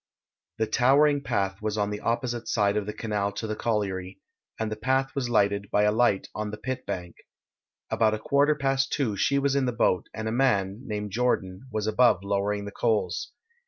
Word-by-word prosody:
The 110 - +1
towering 140 +6 +4
path 95 -6 -1
was 110 0 -2
on 105 0 0
the 105 - -4
opposite 120 +1 -2
side 100 -1 +2
of 105 -1 -1
the 105 - -3
canal 105 -2 -2
to 100 +3 -4
the 110 0 -3
colliery, 100 -5 -2 0.4
and 110 -1 -2
the - - -2
path 130 +4 0
was 130 -3 -2
lighted 100 -3 +1
by 105 - +2
a 105 - +4
light 110 -3 +2
on 105 0 -3
the 105 - -6
pit 130 +4 -5
bank. 90 -2 -5 0.7
About 110 -1 +3
a - - -4
quarter 145 +5 +2
past 135 -1 0
two 125 -8 0
she 140 +7 +2
was 140 0 +1
in 140 -1 +2
the - - +1
boat, 100 -5 +1
and 110 0 -5
a - - -1
man, 105 -6 +1
named 105 -1 -4
Jordan, 110 -2 -1
was 110 -1 -2
above 110 -3 +3
lowering 100 +1 -1
the 100 - -6
coals. 100 -7 -1
110 Hz, 200 wpm, -26 LUFS, 100-125 Hz, 0.7 s, towering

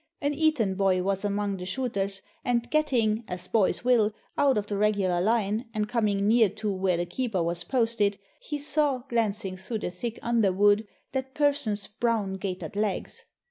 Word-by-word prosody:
An 285 +1 0
Eton 290 -10 +2
boy 190 -1 +2
was 195 +1 -1
among 205 -1 -1
the 180 - -6
shooters, 195 -3 -2 0.2
and 240 -1 0
getting, 240 -8 +2
as 180 -1 -6
boys 215 -1 +1
will, 235 -4 +4 0.2
out 275 -4 +3
of 205 - 0
the 205 - -3
regular 200 -4 +2
line, 215 +2 +1
and 210 -1 0
coming 210 -3 +1
near 225 -1 +5
to 210 0 -3
where 185 -2 +1
the 175 - -1
keeper 195 0 -1
was 170 +1 -2
posted, 225 -5 +1 0.2
he 295 - -4
saw, 290 -3 0
glancing 210 -5 -1
through 205 +5 -4
the 210 - -4
thick 230 +6 -5
underwood, 205 -2 +3 0.2
that 265 0 -4
person's 280 -9 +1
brown 210 -1 -1
gaitered 190 0 -5
legs. 210 -2 -2
210 Hz, 170 wpm, -27 LUFS, 195-240 Hz, 0.2 s, near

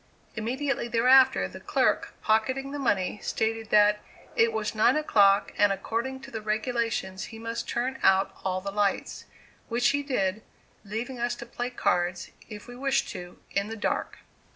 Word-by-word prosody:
Immediately 255 +3 -2
thereafter, 255 +3 +5
the - - -10
clerk, - - 0
pocketing 260 +5 +1
the 290 - -4
money, 205 -6 0
stated 225 0 -2
that 210 0 +5 0.4
"it 230 0 +4
was 220 -1 -2
nine 225 +3 +4
o'clock 205 -10 +3
and 205 -1 +5
according 235 +7 -3
to 270 +1 -11
the 220 - -5
regulations 215 -3 -2
he 225 - -10
must 230 +1 -5
turn 255 +3 -2
out 195 0 +3
all 185 -1 -1
the 200 +1 -4
lights" 205 -1 -1 0.4
which 240 +1 +2
he 285 +2 +1
did, 215 -8 -1 0.4
leaving 230 +5 -5
us 240 0 -1
to 235 - -9
play 245 +1 -4
cards, 175 -7 -1 0.2
if 210 -2 -9
we 245 - -9
wished 270 +1 0
to, 175 0 -8
in 200 +1 0
the 225 +1 -6
dark. 210 - -2
225 Hz, 165 wpm, -27 LUFS, 205-245 Hz, 0.4 s, thereafter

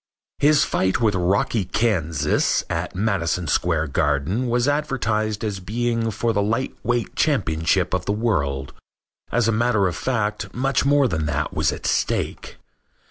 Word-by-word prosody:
His 150 +1 +5
fight 95 +3 0
with 110 -4 +2
Rocky 95 +4 +1
Kansas 80 -10 +1
at 85 +3 -3
Madison 90 -4 0
Square 80 0 0
Garden 75 - 0
was 120 +2 +1
advertised 115 -8 -1
as 105 -3 -2
being 115 +4 -1
for 115 +2 -1
the 100 - +1
lightweight 120 +2 -2
championship 90 - +1
of 90 -1 -1
the - - 0
world. 70 - -1 0.6
As 120 -1 +2
a - - +3
matter 115 -2 +2
of 90 - -3
fact 110 -5 -2
much 135 +2 +1
more 140 -1 +4
than 80 -8 -2
that 75 - -2
was - - +1
at - - -7
stake. - - -1
105 Hz, 145 wpm, -22 LUFS, 90-120 Hz, 0.6 s, His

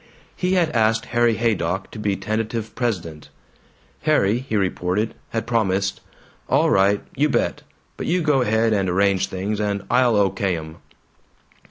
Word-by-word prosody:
He 180 0 0
had 170 -4 +2
asked 115 -1 +2
Harry 120 -1 +3
Haydock 95 -5 -1
to 110 - -8
be 105 -2 0
tentative 110 +2 -3
president. 85 - -3 0.7
Harry, 120 -8 +2
he 130 -4 -4
reported, 95 +2 0 0.2
had 115 - -3
promised, 100 -4 0 0.5
"All - - +3
right. 100 +1 +3
You 150 +3 +2
bet. - - 0 0.4
But - - -4
you 175 0 +1
go 145 -4 +3
ahead 110 -1 +2
and 95 -3 +1
arrange 95 +1 +2
things, 100 +3 -3
and 100 -1 -1
I'll 125 -2 +4
O.K. 95 -2 +1
'em." 80 0 -9
110 Hz, 150 wpm, -22 LUFS, 95-120 Hz, 0.7 s, I'll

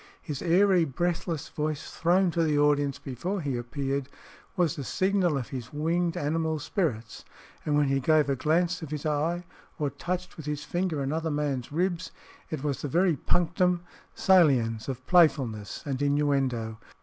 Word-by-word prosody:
His 145 -3 -6
airy, 180 +1 +4
breathless 165 +1 -2
voice, 150 -1 -3
thrown 180 +2 +2
to 165 - 0
the 155 -2 +2
audience 145 -1 +2
before 175 - -4
he 140 -6 -2
appeared, 135 +3 -3 0.5
was 170 -2 +2
the 145 - -5
signal 185 -1 +1
of 125 - -4
his 125 -2 -6
winged 170 +3 0
animal 160 0 0
spirits; 145 - -2 0.4
and 150 -1 +1
when 145 -1 +3
he 135 0 +2
gave 155 +2 +3
a 140 - +1
glance 165 +7 +1
of 160 - -6
his 150 -1 -5
eye 160 +4 0 0.3
or 145 -4 -1
touched 180 +1 -4
with 155 -2 -8
his 150 0 -3
finger 175 -4 -1
another 160 +4 -1
man's 145 -4 -2
ribs, 175 +1 -1 0.4
it 155 -3 -4
was 145 -2 -1
the - - -2
very 170 +3 +2
punctum 175 +4 +1 0.3
saliens 135 - +3
of 130 -1 -5
playfulness 135 - +2
and 140 -2 -3
innuendo. 135 -6 0
150 Hz, 160 wpm, -28 LUFS, 140-175 Hz, 0.5 s, airy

